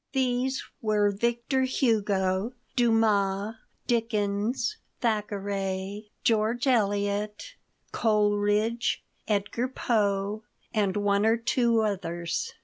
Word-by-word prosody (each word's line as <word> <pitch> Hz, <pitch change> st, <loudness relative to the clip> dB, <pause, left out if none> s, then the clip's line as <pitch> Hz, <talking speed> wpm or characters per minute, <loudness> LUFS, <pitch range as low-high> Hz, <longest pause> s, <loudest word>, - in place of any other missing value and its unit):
These 260 Hz, 0 st, 0 dB, 0.2 s
were 210 Hz, -2 st, +2 dB
Victor 235 Hz, +5 st, 0 dB
Hugo, 210 Hz, -5 st, +1 dB, 0.2 s
Dumas, 215 Hz, -4 st, +2 dB, 0.3 s
Dickens, 225 Hz, -, 0 dB, 0.2 s
Thackeray, 200 Hz, -2 st, -2 dB
George 230 Hz, -1 st, +2 dB
Eliot, 210 Hz, -, 0 dB, 0.4 s
Coleridge, 210 Hz, +2 st, +1 dB, 0.2 s
Edgar 210 Hz, +4 st, 0 dB
Poe, 210 Hz, -4 st, 0 dB, 0.3 s
and 205 Hz, -3 st, +1 dB
one 205 Hz, 0 st, +2 dB
or 225 Hz, +1 st, +4 dB
two 235 Hz, -1 st, +2 dB
others. 175 Hz, -5 st, -2 dB
215 Hz, 80 wpm, -27 LUFS, 200-235 Hz, 0.4 s, or